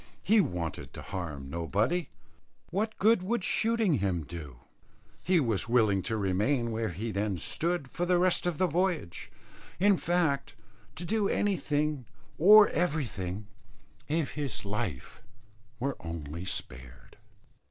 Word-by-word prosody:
He 215 +1 +5
wanted 80 - -4
to - - -8
harm 75 -7 -5
nobody. 100 - -1 0.6
What 215 +4 -1
good 215 -1 +4
could 235 -2 0
shooting 220 - +2
him 95 -4 0
do? 75 -6 -9 0.6
He 180 -1 +3
was 115 -5 -1
willing 110 -5 +3
to 110 - 0
remain 105 +6 +1
where 110 0 -1
he 105 +6 -4
then 100 -2 -1
stood 170 - 0
for 175 +7 -3
the 180 0 +4
rest 180 0 +2
of 175 -4 -1
the 185 - +3
voyage, 175 - -1 0.5
in 200 +1 +5
fact 165 -7 0 0.4
to 175 - -5
do 210 +1 +1
anything 150 - 0 0.3
or 210 +5 +9
everything, 110 - -2 0.6
if 155 -1 0
his 145 -8 -4
life 95 -10 -4 0.6
were 135 +2 -1
only 85 0 -6
spared. 65 -8 -7
130 Hz, 130 wpm, -29 LUFS, -, 0.6 s, or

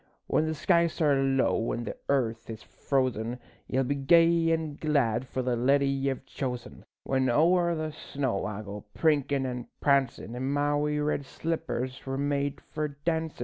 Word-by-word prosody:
When 155 - +1
the 160 - -1
skies 170 +1 +2
are 145 -4 +3
low 135 -4 +1
an' 120 - -3
the - - -5
earth 115 -5 0
is 110 -1 -7
frozen, 125 -3 -1 0.3
Ye'll 130 +1 +1
be 135 +3 0
gay 165 +4 +4
an' 160 -3 -1
glad 130 -6 +1
for 130 0 -3
the 125 -1 0
leddie 140 +4 +3
ye've 135 -1 -1
chosen, 125 -3 -5 0.2
When 130 -1 +1
ower 170 +6 +3
the 155 -1 -3
snow 135 -7 -3
I 105 0 -5
go 105 0 -7
prinkin' 145 -4 +2
an' 125 -1 -4
prancin' 135 -5 +1
In 130 +2 -2
my 145 0 +1
wee 150 0 0
red 150 -1 0
slippers 130 -7 -3
were 135 0 -3
made 140 0 -1
for 155 -1 -3
dancin'. 160 +2 -3
140 Hz, 170 wpm, -28 LUFS, 125-150 Hz, 0.3 s, gay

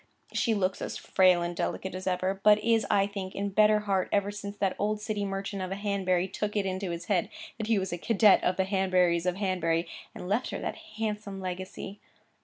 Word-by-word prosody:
She 225 -3 +1
looks 190 -2 0
as - - -4
frail 185 -2 +3
and 175 0 -3
delicate 190 +2 -3
as 185 +1 -6
ever, 185 +1 0
but 210 0 +7
is, 225 -2 +2
I 200 -1 +4
think, 195 -2 -6
in 200 +1 -1
better 210 +1 +4
heart 195 -3 0
ever 200 0 +1
since 205 0 -7
that 195 -2 0
old 210 +1 0
city 210 -1 -2
merchant 195 0 -4
of 185 - -3
a - - -1
Hanbury 195 -3 0
took 210 +2 -3
it 205 -2 +1
into 190 0 -2
his 170 0 -5
head 185 -5 +1 0.3
that 220 - -3
he 225 -2 +3
was 190 -2 -2
a 175 - -4
cadet 215 0 +5
of 180 - +1
the 190 - +2
Hanburys 185 -3 +2
of 180 - +1
Hanbury, 175 -4 0 0.3
and 180 - -7
left 210 +6 0
her - - -3
that - - -4 0.2
handsome 210 -3 -3
legacy. 185 +2 -6
195 Hz, 215 wpm, -29 LUFS, 185-205 Hz, 0.3 s, but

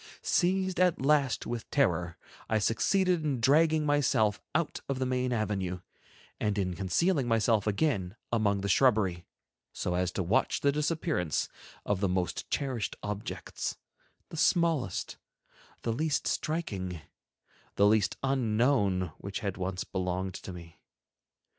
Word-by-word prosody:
Seized 185 0 +1
at 180 -2 +3
last 140 -1 +2
with 120 -1 -5
terror, 85 - +1 0.3
I 110 - +3
succeeded 175 - +2
in 140 -5 0
dragging 155 +5 +4
myself 135 -8 +2
out 170 -1 0
of 135 - -1
the 130 - 0
main 125 0 0
avenue, 95 -6 -1 0.6
and 105 -1 0
in 90 -2 0
concealing 130 - +1
myself 115 -2 +2
again 100 - 0 0.2
among 100 -3 +2
the 100 - -2
shrubbery, 100 -5 +2 0.5
so 90 - -2
as 90 0 0
to 95 - -1
watch 95 +7 +1
the 140 - +4
disappearance 150 - -1 0.4
of 105 -2 0
the 100 -1 +1
most 90 -1 -2
cherished 130 -6 -2
objects, 105 0 -4 0.5
the 165 - -8
smallest, 160 - +1 0.7
the 115 - 0
least 150 +4 0
striking, 95 - -2 0.7
the 100 - +4
least 105 -1 +3
unknown 115 - +2
which 100 0 -5
had 100 -2 -2
once 95 0 -3
belonged 95 0 -2
to 95 - -7
me. 85 -2 -11
110 Hz, 135 wpm, -30 LUFS, 95-145 Hz, 0.7 s, dragging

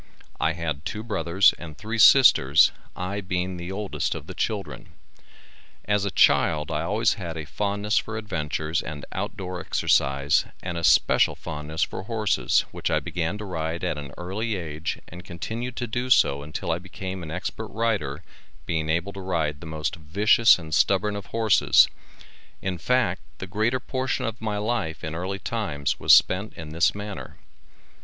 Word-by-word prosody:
I 80 +2 +1
had 80 -3 -4
two 105 +6 -5
brothers 95 -4 +3
and 80 -3 -9
three 110 +4 -4
sisters, 85 - +7 0.2
I 95 +3 -3
being 90 -1 -2
the 85 +2 -6
oldest 100 0 -2
of - - -7
the - - -8
children. - - -4 0.9
As 105 -1 +1
a - - 0
child 75 -4 +3
I - - -1
always 110 +2 +1
had 85 -2 -5
a 80 - -5
fondness 105 +4 0
for 110 0 -6
adventure 80 -7 -3
and 75 -2 -7
out 105 +3 -4
door 90 -2 -5
exercise 70 +1 +2 0.2
and 90 -1 -4
especial 85 -1 +4
fondness 75 +2 -4
for - - -4
horses 110 +1 +1
which - - -3
I - - +2
began 85 +3 -3
to 105 - -7
ride 80 -2 -3
at 75 - -1
an 70 -2 -8
early 105 +5 -3
age 80 -3 -4
and 90 +1 -10
continued 115 +8 -5
to 125 - -3
do 120 +3 -3
so 70 - +4
until 75 +4 -4
I 80 - 0
became 95 +1 -7
an 80 - -7
expert 95 +6 -4
rider 100 -10 -2 0.4
being 80 -1 -1
able 85 +5 0
to 100 - -7
ride 80 -5 -1
the 85 - -8
most 80 +1 -3
vicious 100 +9 +4
and 80 -3 -8
stubborn 100 +6 +2
of 100 -1 -7
horses, 110 -2 +4 0.7
in 95 -2 -3
fact 100 -3 +1 0.2
the - - -6
greater 110 +7 0
portion 130 0 -2
of 115 0 -4
my 105 -2 -2
life 105 -7 -2
in 80 - -4
early 90 +4 -3
times 95 -10 -2
was - - +3
spent 100 +3 +5
in 80 -2 -8
this 85 +5 +2
manner. 105 0 -7
95 Hz, 170 wpm, -25 LUFS, 80-105 Hz, 0.9 s, sisters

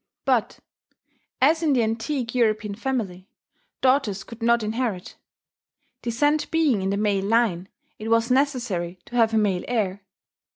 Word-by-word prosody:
But, - - +1 0.9
as 320 +4 +4
in 310 -3 +2
the 245 -3 +3
antique 230 +3 -2
European 215 -4 +1
family, 210 -5 -4 0.5
daughters 255 -7 +2
could 230 0 -12
not 235 0 +3
inherit: 215 -4 -3 0.9
descent 290 +6 +1
being 305 -10 +2
in 190 - -1
the 200 - 0
male 200 -2 +1
line, 200 -5 +1 0.3
it 215 - -6
was 230 +2 +2
necessary 240 -11 0
to 245 - -10
have 230 -2 +4
a - - +4
male 200 -4 +1
heir. 205 -5 -1
230 Hz, 140 wpm, -24 LUFS, 200-255 Hz, 0.9 s, as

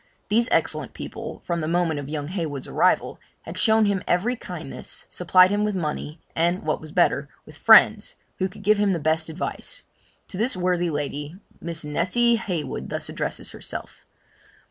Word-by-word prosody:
These 230 +3 +3
excellent - - 0
people, - - -7
from 170 -1 -1
the 155 - -2
moment 165 -2 +1
of 140 0 -7
young 150 -1 -3
Heywood's 160 -7 -3
arrival, - - +2 0.2
had 165 - -8
shown 220 0 +4
him 200 -2 +1
every 210 +8 +2
kindness, - - -7
supplied 185 0 +5
him 205 +1 +1
with 210 -1 0
money, 155 -2 -3 0.2
and 175 +3 +1
what 155 0 -1
was 155 -1 -10
better, - - +2 0.2
with - - -14
friends, - - +6 0.2
who 190 - +1
could 200 +3 -13
give 210 +1 +4
him 205 -2 +3
the 170 - -1
best 160 +1 +1
advice. 185 - -5 0.5
To 185 - -5
this 225 0 +1
worthy 180 -1 +1
lady, 145 +1 -3 0.3
Miss 165 -1 -4
Nessy 190 +11 +2
Heywood 175 - -4
thus - - -4
addresses - - -4
herself. - - -7
175 Hz, 170 wpm, -24 LUFS, 155-205 Hz, 0.5 s, friends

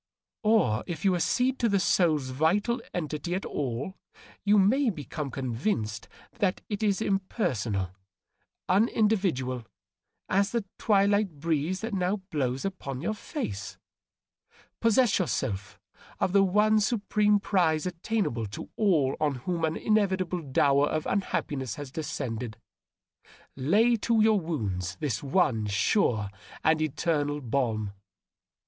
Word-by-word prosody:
* - - -66
Or, 210 - +3
if 170 0 -5
you 190 - +4
accede 250 +9 +1
to 235 - +2
the 200 -1 +2
soul's 155 -8 +2
vital 200 - +1
entity 155 0 -3
at 190 - -3
all, 140 - -3 0.4
you 205 +1 +4
have 220 +3 +3
become 145 0 -5
convinced 115 - -2 0.3
that 195 -4 +1
it 205 0 -3
is 210 0 +1
impersonal, 130 - -1 0.8
unindividual 185 - +1 0.6
as 195 +1 +2
the 235 -4 0
twilight 200 -5 +2
breeze 165 +4 -1
that 225 0 -4
now 185 +1 +1 0.2
blows 135 -2 -1
upon 140 -9 -4
your 215 - -1
fa<«. 215 - -4 1.2
Possess 230 -1 +3
yourself 100 - -2 0.4
of 185 - 0
the 200 - +6
one 210 +3 +4
supreme 210 -1 +2
prize 170 -6 +1
attainable 180 - -1
to 100 - -8
all 165 -11 +3
on 150 -3 +1
whom 175 -2 -1
an 160 0 0
inevitable 190 -5 +1
dower 140 0 +3
of 155 - -2
unhappiness 140 - -2
has 145 -3 -7
descended. 120 -7 -4 1.0
Lay 210 - +3
to 230 +1 +1
your 215 -1 +5
wounds 100 - -3
the 150 - -1
one 135 - +1
sure 105 - +1 0.3
and 160 0 +3
eternal 150 -1 0
balm. 115 -6 -1
170 Hz, 125 wpm, -28 LUFS, 130-205 Hz, 1.2 s, the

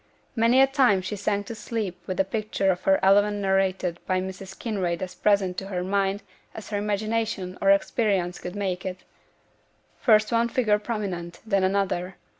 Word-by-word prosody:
Many 230 +2 +4
a - - +8
time 260 -9 +3
she 200 +3 -4
sank 205 0 -1
to 230 - -6
sleep 210 -4 -4
with 185 - -3
the - - +4
picture 200 -1 0
of 180 - -4
the 195 - +5
event 205 +1 +4
narrated 190 -3 0
by 185 -1 +1
Mrs. 190 0 -7
Kinraid 185 -6 -2
as 185 - -6
present 195 -3 +1
to 195 - -8
her 180 -2 -3
mind 195 +1 0 0.3
as 220 - -9
her 205 - 0
imagination 210 -2 -2
or 195 - +3
experience 195 -3 +1
could 180 +2 -7
make 190 -3 -2
it: 185 -1 -6 1.0
first 215 -2 +4
one 235 0 +2
figure 215 -4 +2
prominent, 190 -6 -4
then 200 -3 +1
another. 185 -1 0
195 Hz, 175 wpm, -25 LUFS, 185-215 Hz, 1.0 s, a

